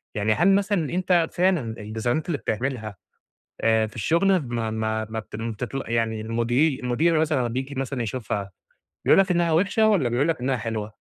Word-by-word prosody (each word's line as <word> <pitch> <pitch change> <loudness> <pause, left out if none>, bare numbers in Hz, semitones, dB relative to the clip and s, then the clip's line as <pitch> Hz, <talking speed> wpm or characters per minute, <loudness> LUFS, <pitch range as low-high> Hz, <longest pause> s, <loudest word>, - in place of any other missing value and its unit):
يعني 105 +1 +2
هل 195 - +4
مثلًا 200 -6 0
أنت 180 -2 +2
فعلًا 180 -3 +2 0.2
الديزاينات 115 +8 -2
اللي 160 -4 -1
بتعملها 110 -3 -3 0.7
آآ 110 -1 +3
في 110 - -13
الشغل 185 - +3
ما 115 -2 -2
ما 110 0 -2
ما 110 0 -3 0.2
بت 115 +1 -4 0.2
يعني 115 -1 -1
المدير 120 +6 +1
المدير 155 +7 +2
مثلًا 155 -2 +1
لمّا 125 -2 0
بييجي 130 +4 -4
مثلًا 135 -1 -3
يشوفها 105 -4 -3 0.5
بيقول - - +5
لك 195 -1 +1
إنها 170 -2 +2
وحشة 200 +6 +3
والّا 185 - +3
بيقول 130 +7 +1
لك 160 -6 0
إنها 130 +1 0
حلوة؟ 110 -1 -4
125 Hz, 175 wpm, -24 LUFS, 110-165 Hz, 0.7 s, بيقول